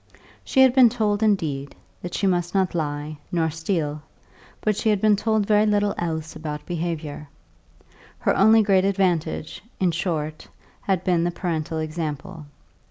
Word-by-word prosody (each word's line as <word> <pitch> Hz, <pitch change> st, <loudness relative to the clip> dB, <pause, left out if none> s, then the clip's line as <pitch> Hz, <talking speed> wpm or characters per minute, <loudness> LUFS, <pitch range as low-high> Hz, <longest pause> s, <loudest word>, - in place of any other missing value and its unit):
She 265 Hz, -, +2 dB
had 260 Hz, -2 st, +5 dB
been 255 Hz, -3 st, +7 dB
told, 215 Hz, -3 st, 0 dB
indeed, 155 Hz, -10 st, 0 dB, 0.3 s
that 180 Hz, -, -6 dB
she 200 Hz, -, 0 dB
must 175 Hz, -1 st, 0 dB
not 190 Hz, -2 st, +1 dB
lie 150 Hz, -2 st, -3 dB
nor 165 Hz, -3 st, +1 dB
steal; 160 Hz, -2 st, -2 dB, 0.6 s
but 215 Hz, -1 st, 0 dB
she 220 Hz, -, 0 dB
had 210 Hz, -2 st, +2 dB
been 215 Hz, +1 st, +4 dB
told 220 Hz, 0 st, 0 dB
very 210 Hz, +1 st, +3 dB
little 205 Hz, -1 st, +2 dB
else 160 Hz, -2 st, -4 dB
about 150 Hz, -1 st, -6 dB
behaviour; 160 Hz, -4 st, -4 dB, 0.9 s
her -, -, +1 dB
only 220 Hz, +4 st, +6 dB
great 195 Hz, -2 st, +3 dB
advantage, 180 Hz, -6 st, -1 dB, 0.2 s
in 185 Hz, -2 st, +2 dB
short, 155 Hz, -3 st, -3 dB, 0.3 s
had 190 Hz, -3 st, 0 dB
been 175 Hz, -3 st, +2 dB
the 175 Hz, -, +1 dB
parental 165 Hz, -2 st, -3 dB
example. 155 Hz, +1 st, -5 dB
175 Hz, 155 wpm, -23 LUFS, 155-205 Hz, 0.9 s, been